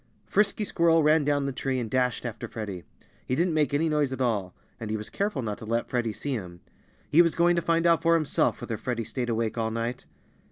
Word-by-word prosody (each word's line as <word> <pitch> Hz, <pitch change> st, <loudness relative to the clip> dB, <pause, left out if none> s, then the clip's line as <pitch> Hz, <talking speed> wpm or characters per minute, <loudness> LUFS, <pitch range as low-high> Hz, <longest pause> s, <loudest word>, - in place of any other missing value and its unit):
Frisky 210 Hz, +1 st, +1 dB
Squirrel 165 Hz, -4 st, +3 dB
ran 155 Hz, +1 st, +4 dB
down 145 Hz, -1 st, +1 dB
the 140 Hz, -, -1 dB
tree 130 Hz, 0 st, -2 dB
and 120 Hz, -, -3 dB
dashed 125 Hz, +1 st, 0 dB
after 115 Hz, -2 st, -5 dB
Freddie. 100 Hz, -7 st, -6 dB, 0.4 s
He 130 Hz, -, 0 dB
didn't 170 Hz, +2 st, +1 dB
make 150 Hz, -3 st, +2 dB
any 150 Hz, +3 st, +1 dB
noise 150 Hz, -3 st, +1 dB
at 130 Hz, -, -4 dB
all. 105 Hz, -8 st, -1 dB, 0.2 s
And 115 Hz, -, -5 dB
he 110 Hz, -, -1 dB
was 105 Hz, -, -7 dB
careful 200 Hz, -10 st, -1 dB
not 105 Hz, -2 st, -4 dB
to -, -, -8 dB
let 115 Hz, +1 st, -2 dB
Freddie 120 Hz, -3 st, 0 dB
see 140 Hz, +6 st, -4 dB
him. 90 Hz, -7 st, -6 dB, 0.5 s
He 165 Hz, -, +7 dB
was 170 Hz, -2 st, +2 dB
going 175 Hz, +1 st, +4 dB
to 170 Hz, -, +1 dB
find 165 Hz, 0 st, +1 dB
out 170 Hz, -1 st, +4 dB
for 165 Hz, 0 st, +4 dB
himself 155 Hz, -3 st, +1 dB
whether 115 Hz, -, -4 dB
Freddie 120 Hz, 0 st, -3 dB
stayed 120 Hz, +2 st, -4 dB
awake 115 Hz, 0 st, -1 dB
all 110 Hz, 0 st, 0 dB
night. 115 Hz, +2 st, -3 dB
130 Hz, 235 wpm, -27 LUFS, 115-160 Hz, 0.5 s, He